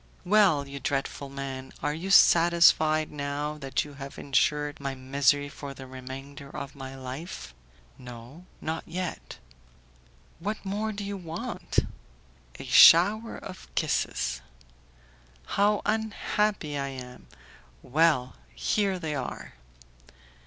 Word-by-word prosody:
"Well, 180 Hz, -8 st, +4 dB
you 140 Hz, 0 st, -7 dB
dreadful 140 Hz, 0 st, -3 dB
man, 135 Hz, -1 st, -6 dB
are 150 Hz, -, 0 dB
you 170 Hz, +5 st, -5 dB
satisfied, 165 Hz, -4 st, +5 dB
now 145 Hz, +1 st, -3 dB
that 135 Hz, 0 st, -1 dB
you 145 Hz, -, -11 dB
have 140 Hz, 0 st, -9 dB
insured 145 Hz, +1 st, 0 dB
my 140 Hz, -1 st, -3 dB
misery 140 Hz, +2 st, +2 dB
for 140 Hz, -1 st, -8 dB
the 135 Hz, -, -9 dB
remainder 135 Hz, +2 st, -9 dB
of 140 Hz, 0 st, -7 dB
my 135 Hz, -1 st, -8 dB
life?" 130 Hz, -, -7 dB, 0.5 s
"No, 125 Hz, +8 st, -11 dB
not 160 Hz, +1 st, -3 dB
yet." 180 Hz, +1 st, -5 dB, 1.0 s
"What 205 Hz, +4 st, -4 dB
more 210 Hz, +3 st, -2 dB
do 205 Hz, -1 st, -5 dB
you 200 Hz, 0 st, -4 dB
want?" 170 Hz, -3 st, -6 dB, 0.8 s
"A -, -, -8 dB
shower 210 Hz, +7 st, +7 dB
of 185 Hz, -, -10 dB
kisses." 60 Hz, +1 st, -1 dB, 1.0 s
"How 205 Hz, -, +2 dB
unhappy 210 Hz, -7 st, -1 dB
I 140 Hz, -, -2 dB
am! 125 Hz, -2 st, -9 dB, 0.6 s
Well! 145 Hz, -3 st, +2 dB, 0.2 s
here 200 Hz, -3 st, 0 dB
they 160 Hz, -4 st, -4 dB
are." 140 Hz, -, -5 dB
145 Hz, 115 wpm, -27 LUFS, 135-180 Hz, 1.0 s, shower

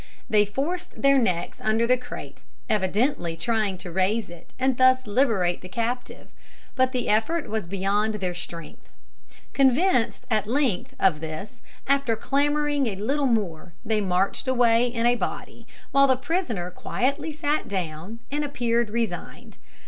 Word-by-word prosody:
They 210 Hz, -1 st, +3 dB
forced 335 Hz, -, -4 dB
their 275 Hz, 0 st, +6 dB
necks 180 Hz, -8 st, -1 dB
under 220 Hz, +2 st, +2 dB
the 250 Hz, +2 st, +4 dB
crate, 250 Hz, 0 st, -9 dB, 0.3 s
evidently 205 Hz, -, 0 dB
trying 210 Hz, +1 st, 0 dB
to 180 Hz, -1 st, -8 dB
raise 190 Hz, +3 st, 0 dB
it, 175 Hz, -1 st, -14 dB
and 260 Hz, 0 st, +2 dB
thus 255 Hz, +1 st, +4 dB
liberate 205 Hz, -6 st, +1 dB
the 185 Hz, -, -10 dB
captive; 235 Hz, +5 st, -4 dB, 0.4 s
but 260 Hz, -1 st, +2 dB
the 250 Hz, -2 st, -2 dB
effort 295 Hz, +11 st, +1 dB
was 215 Hz, -5 st, -3 dB
beyond 200 Hz, +3 st, 0 dB
their 185 Hz, -4 st, -2 dB
strength. 170 Hz, -2 st, -8 dB, 0.6 s
Convinced, 265 Hz, -, +2 dB
at 215 Hz, -2 st, +1 dB
length, 250 Hz, -6 st, 0 dB
of 180 Hz, -6 st, +3 dB
this, 160 Hz, +9 st, -7 dB, 0.2 s
after 275 Hz, -4 st, +2 dB
clamouring 290 Hz, +2 st, +1 dB
a 205 Hz, -, -2 dB
little 270 Hz, +8 st, 0 dB
more 185 Hz, -8 st, -1 dB
they 215 Hz, -1 st, +1 dB
marched 190 Hz, +4 st, 0 dB
away 240 Hz, -2 st, +4 dB
in 235 Hz, -1 st, -1 dB
a 240 Hz, -, +5 dB
body, 245 Hz, -, -5 dB, 0.2 s
while 275 Hz, 0 st, +5 dB
the 260 Hz, -, +4 dB
prisoner 255 Hz, -, -2 dB
quietly 275 Hz, -, -2 dB
sat 300 Hz, 0 st, -1 dB
down 185 Hz, +3 st, -4 dB
and 295 Hz, +1 st, -1 dB
appeared 235 Hz, -5 st, 0 dB
resigned. 215 Hz, -6 st, -4 dB
230 Hz, 150 wpm, -25 LUFS, 195-265 Hz, 0.6 s, their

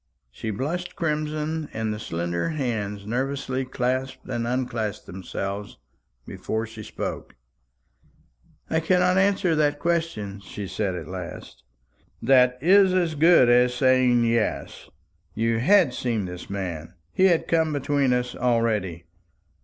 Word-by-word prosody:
She 110 Hz, -, -6 dB
blushed 155 Hz, -, -3 dB
crimson, 155 Hz, 0 st, -2 dB
and 110 Hz, -1 st, -2 dB
the 105 Hz, -, -6 dB
slender 85 Hz, -, -2 dB
hands 110 Hz, -9 st, -3 dB
nervously 130 Hz, +2 st, -2 dB
clasped 130 Hz, +1 st, -2 dB
and 115 Hz, 0 st, -2 dB
unclasped 120 Hz, -4 st, -2 dB
themselves 100 Hz, +2 st, -6 dB, 0.5 s
before 110 Hz, +1 st, -3 dB
she 110 Hz, -1 st, -10 dB
spoke. -, -, -6 dB, 1.3 s
"I 160 Hz, -, +1 dB
cannot 180 Hz, +2 st, +3 dB
answer 195 Hz, -3 st, +2 dB
that 150 Hz, -2 st, +2 dB
question," 155 Hz, -12 st, -2 dB
she 100 Hz, +1 st, -7 dB
said 95 Hz, -1 st, -2 dB
at 80 Hz, -3 st, -6 dB
last. 90 Hz, -1 st, -8 dB, 0.6 s
"That 125 Hz, -2 st, +4 dB
is 190 Hz, +4 st, +6 dB
quite 185 Hz, -, +4 dB
as 165 Hz, -2 st, -2 dB
good 160 Hz, -3 st, +5 dB
as 125 Hz, 0 st, +4 dB
saying 130 Hz, -1 st, +4 dB
'yes.' 115 Hz, -1 st, -1 dB, 0.5 s
You 115 Hz, +1 st, +1 dB
had 170 Hz, -, +4 dB
seen 115 Hz, -5 st, -1 dB
this 90 Hz, -1 st, -8 dB
man; 90 Hz, -4 st, -5 dB, 0.2 s
he 190 Hz, -, +3 dB
had 175 Hz, -4 st, +3 dB
come 160 Hz, -2 st, +2 dB
between 140 Hz, -2 st, +1 dB
us 125 Hz, 0 st, -1 dB
already. 110 Hz, -8 st, 0 dB
125 Hz, 130 wpm, -24 LUFS, 105-155 Hz, 1.3 s, is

